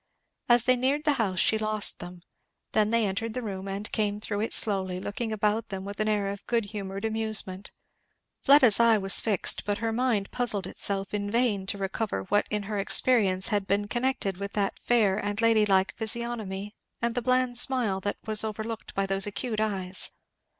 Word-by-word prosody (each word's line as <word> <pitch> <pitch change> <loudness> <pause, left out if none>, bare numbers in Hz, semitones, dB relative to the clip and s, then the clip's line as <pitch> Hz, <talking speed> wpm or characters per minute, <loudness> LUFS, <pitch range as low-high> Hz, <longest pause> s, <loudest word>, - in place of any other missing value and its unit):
As 240 -1 +5
they 255 0 +3
neared 270 +4 -1
the 300 -2 +2
house 190 -4 -2
she 220 +5 +3
lost 215 -1 +2
them 175 0 -10 0.5
then 215 -1 +2
they 230 -1 +1
entered 215 +3 -3
the 250 - -4
room 195 -2 -6
and 200 +2 -5
came 205 -1 -1
through 205 -1 -4
it 220 - -2
slowly, 190 -3 +2
looking 220 +4 -5
about 215 +1 -1
them 190 -1 -6
with 200 +1 -8
an 215 - 0
air 205 -2 0
of 200 0 -7
good 235 -3 0
humoured 195 0 -5
amusement. 215 -3 -1 0.7
Fleda's 270 -7 +5
eye 230 -1 +5
was 195 -1 +5
fixed 210 -4 0
but 205 0 -2
her 225 0 -2
mind 225 -4 -1
puzzled 215 -5 +1
itself 195 0 -4
in 205 -1 -3
vain 215 -4 0
to 200 - -3
recover 195 +2 -3
what 205 +2 0
in 210 -1 -2
her 205 0 -4
experience 195 -3 +4
had 205 -2 -1
been 205 +1 0
connected 240 -5 -2
with 200 +1 -6
that 200 -2 -2
fair 210 -5 +1
and 205 0 -3
lady 225 -2 +3
like 190 -1 +2
physiognomy 220 -3 -5 0.3
and 235 0 -1
the 245 - -2
bland 255 0 +2
smile 245 -9 +3
that 205 +1 -3
was 215 -1 +5
overlooked 220 +1 -6
by 195 - 0
those 195 +1 +1
acute 215 +2 -3
eyes. 190 -4 -1
210 Hz, 190 wpm, -26 LUFS, 195-230 Hz, 0.7 s, As